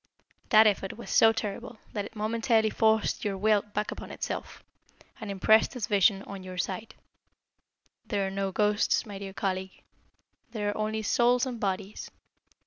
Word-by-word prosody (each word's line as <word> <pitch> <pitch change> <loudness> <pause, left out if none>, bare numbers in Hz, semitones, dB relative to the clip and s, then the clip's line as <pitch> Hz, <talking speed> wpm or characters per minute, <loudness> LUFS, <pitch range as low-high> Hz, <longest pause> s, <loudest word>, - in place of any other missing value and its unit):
That 220 0 +7
effort 195 -2 0
was 235 - -8
so 225 - +6
terrible 220 +1 -5 0.2
that 205 -1 -2
it 225 - -12
momentarily 220 0 +1
forced 220 -1 +1
your 200 -2 -2
will 210 +1 +3
back 210 +1 -4
upon - - -8
itself, - - -6 0.6
and 220 -3 -7
impressed 210 +3 +3
his 240 -4 -2
vision 200 -1 +3
on 200 -1 -8
your 185 0 -8
sight. 190 +4 -4 1.1
There 200 -3 0
are 190 - -3
no 195 0 -2
ghosts, 210 +2 +1
my 200 -3 -8
dear 195 -1 -7
colleague. 190 -1 -4 0.7
There 210 -3 -1
are - - -7
only 215 0 -2
souls 240 +4 +3
and 250 -3 -5
bodies. 195 0 -3
210 Hz, 160 wpm, -28 LUFS, 195-220 Hz, 1.1 s, That